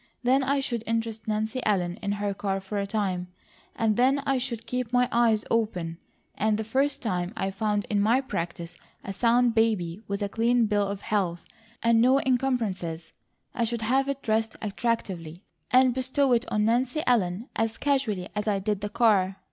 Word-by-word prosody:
Then 260 +3 +4
I 275 +1 +1
should 235 -4 -3
interest 225 -1 -2
Nancy 220 +3 -1
Ellen 180 -4 0
in 200 -1 -1
her 205 0 -2
car 195 0 -2
for 195 +2 -4
a 200 - -2
time, 190 -4 -1 0.5
and 220 -2 +1
then 270 +3 +3
I 270 -1 +1
should 235 -3 -4
keep 250 -2 -3
my 250 0 +3
eyes 230 -2 +3
open, 180 -7 -1 0.3
and 215 0 +1
the 220 - -2
first 265 +6 0
time 180 -5 -1
I 195 0 -1
found 210 +1 -1
in 205 -1 0
my 230 +5 +4
practice 175 -9 -5 0.3
a 195 - -5
sound 240 +3 +3
baby 215 -5 +1
with 200 +1 -2
a - - 0
clean 230 +3 +2
bill 205 -1 +1
of 200 0 -5
health, 180 -6 -1 0.4
and 230 -1 +4
no 260 +3 +5
encumbrances, 225 -11 -1 0.4
I 240 - -1
should 230 0 -2
have 265 +5 +1
it 275 0 -3
dressed 220 0 0
attractively, 195 -6 -3 0.3
and 255 0 +5
bestow 260 +1 +1
it 240 +2 0
on 210 -1 +2
Nancy 250 +6 +1
Ellen 215 -2 +1
as 225 0 -1
casually 255 -10 0
as 210 +1 -3
I 205 -2 +2
did 205 +1 -2
the 205 - -3
car. 200 -4 +2
220 Hz, 185 wpm, -26 LUFS, 200-245 Hz, 0.5 s, no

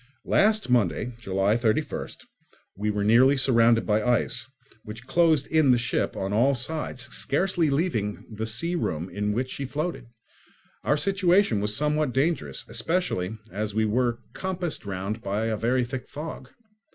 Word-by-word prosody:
Last 215 +1 +3
Monday 120 0 +1
(July 100 -1 +1
31st) 115 -2 -2 0.5
we 105 +2 -2
were 105 -1 -1
nearly 125 +6 +5
surrounded 115 -3 +4
by 105 0 +2
ice, 120 +2 0 0.4
which 110 +3 -9
closed 160 -2 +3
in 155 -3 +3
the 125 - +6
ship 120 +1 -1
on 95 +1 -2
all 130 +6 +3
sides, 130 -1 -3
scarcely 170 +2 +1
leaving 140 - 0
her - - -17
the 110 +1 -4
sea 165 +11 0
room 85 - -2
in 105 +3 -1
which 125 +4 -2
she 140 - -4
floated. 150 -1 -4 0.8
Our 145 - +2
situation 185 - +2
was 105 +1 0
somewhat 150 -2 +1
dangerous, 155 +5 -1
especially 115 - -1
as 105 0 -4
we 110 0 +2
were 120 +2 +1 0.2
compassed 180 - -3
round 100 +3 -4
by 105 +2 -2
a 110 -1 0
very 120 +3 +1
thick 125 +1 -6
fog. 150 +3 -7
125 Hz, 155 wpm, -26 LUFS, 105-150 Hz, 0.8 s, the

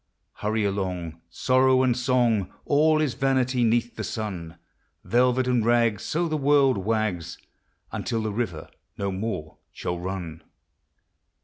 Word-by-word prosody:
Hurry 105 0 0
along, 90 -5 -3
sorrow 130 +7 +3
and 125 -2 +2
song, 120 -6 +1
All 155 +2 +3
is 145 -5 0
vanity 130 -2 +1
'neath 120 +1 +1
the - - -3
sun; 90 -7 -5 0.5
Velvet 125 +1 +2
and 125 -3 +2
rags, 115 -3 +2
so 170 +2 -1
the 155 -1 -1
world 140 -5 +3
wags, 95 -5 -2 0.5
Until 115 -1 -2
the 110 - -2
river 100 -8 -3 0.3
no 100 -1 -2
more 95 -6 -4
shall 90 0 -4
run. 90 -3 -5
115 Hz, 130 wpm, -25 LUFS, 95-130 Hz, 0.5 s, sorrow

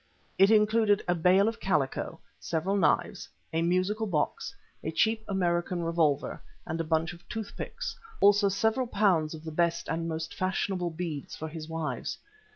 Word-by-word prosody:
It 195 +1 +7
included 215 -1 +4
a 175 - +3
bale 180 +4 +4
of 225 0 -2
calico, 150 -9 -1 0.2
several 170 +4 -1
knives, 195 - +1 0.2
a 165 - +1
musical 185 +6 +1
box, 155 -6 -1 0.3
a - - -2
cheap 220 +7 +1
American 175 -2 0
revolver, 165 -4 +1 0.2
and 165 +1 -2
a - - -1
bundle 165 +2 0
of - - -27
tooth 220 -3 -5
picks; - - -5 0.2
also 205 0 +5
several 220 +6 +1
pounds 180 -8 +2
of 155 - -11
the 160 - -6
best 170 +1 0
and 165 +1 -2
most 160 0 -4
fashionable 185 -1 -1
beads 160 -3 -5
for 160 - -5
his 155 0 -7
wives. 155 -7 -3
175 Hz, 165 wpm, -29 LUFS, 160-200 Hz, 0.3 s, It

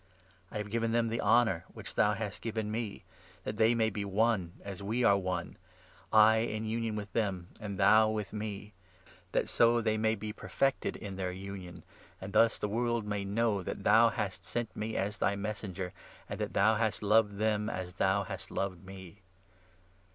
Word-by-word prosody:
I - - -13
have 105 - -1
22 105 - -12
given 115 0 0
them 115 -1 +2
the 115 +1 -1
honour 110 -8 +3
which - - -9
thou - - +3
hast - - -5
given 110 -2 -3
me, 110 -3 -4 0.4
that 105 - -4
they 115 +2 +4
may 110 -1 +2
be 105 0 -3
one 100 -3 +1
as 100 -1 -7
we 110 +5 -1
are 100 - +6
one 90 -3 -3 0.3
— 90 +1 -27
I 110 +1 +7
in 110 -1 -1
23 - - -4
union 115 -1 -1
with 105 -1 -6
them 95 -6 -1
and 100 -3 -5
thou 110 +4 +6
with 105 -2 -3
me 105 -1 -5 0.3
— 95 - -26
that - - +1
so 120 0 +4
they 110 -1 0
may 110 0 +2
be 105 0 -5
perfected 135 +4 -1
in 100 -3 -7
their 90 -1 -2
union, 95 -1 -8 0.4
and 95 +1 -7
thus 115 0 +4
the - - -2
world 120 +1 0
may 105 -1 -2
know 105 0 +1
that - - -5
thou - - +6
hast - - -3
sent 120 -1 -4
me 110 +1 -3
as 100 +3 -2
thy 100 - +2
Messenger, 100 -3 -4 0.3
and - - -6
that - - -3
thou 110 +2 +4
hast 110 -1 0
loved 105 -1 +3
them 105 0 +1
as 90 -1 -5
thou 95 +2 +2
hast 95 - -7
loved 95 -2 -3
me. 95 0 -11
105 Hz, 200 wpm, -31 LUFS, 100-110 Hz, 0.4 s, I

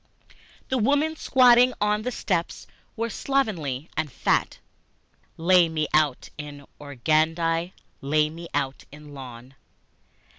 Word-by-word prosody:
The 260 - 0
women 290 +7 +1
squatting 250 -3 +5
on 210 0 +1
the 250 +3 -3
stoops 180 -7 -2 0.3
were 230 0 -3
slovenly 170 - -2
and 150 - -2
fat, - - 0 0.8
(Lay 175 0 +4
me 155 -1 -1
out 150 -4 +1
in 145 -1 -8
organdie, 160 +5 0 0.3
lay 150 +2 +1
me 170 +1 -9
out 140 -2 -3
in 150 0 -13
lawn!) 130 -1 -10
165 Hz, 115 wpm, -25 LUFS, 145-215 Hz, 0.8 s, squatting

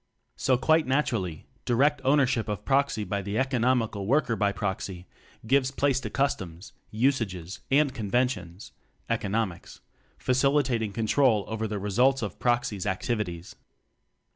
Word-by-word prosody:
So 130 -1 +2
quite 155 +3 +3
na 135 +3 +3
turally, 90 - -3 0.2
direct 140 +5 +2
ownership 130 -5 +2
of 105 -3 -4
Proxy 140 -5 +1
by 100 -1 -2
the 100 +2 -3
economical 125 -6 0
Worker 125 -2 +2
by 100 -2 +1
proxy 95 -2 -4 0.4
gives 130 +2 +3
place 135 -1 +1
to - - -5
customs, 95 -11 -2 0.2
usages, 110 -7 -1
and 140 0 +3
conven 120 +4 +1
tions 90 -6 -8 0.4
(economics), 105 -3 -2 0.4
facilitating 130 -4 +1
control 110 0 +2
over 110 0 -3
the 105 -1 -3
results 120 +7 +2
of 100 -4 -5
Proxy's 120 -5 0
activities. 95 -4 -3
115 Hz, 130 wpm, -27 LUFS, 100-135 Hz, 0.4 s, quite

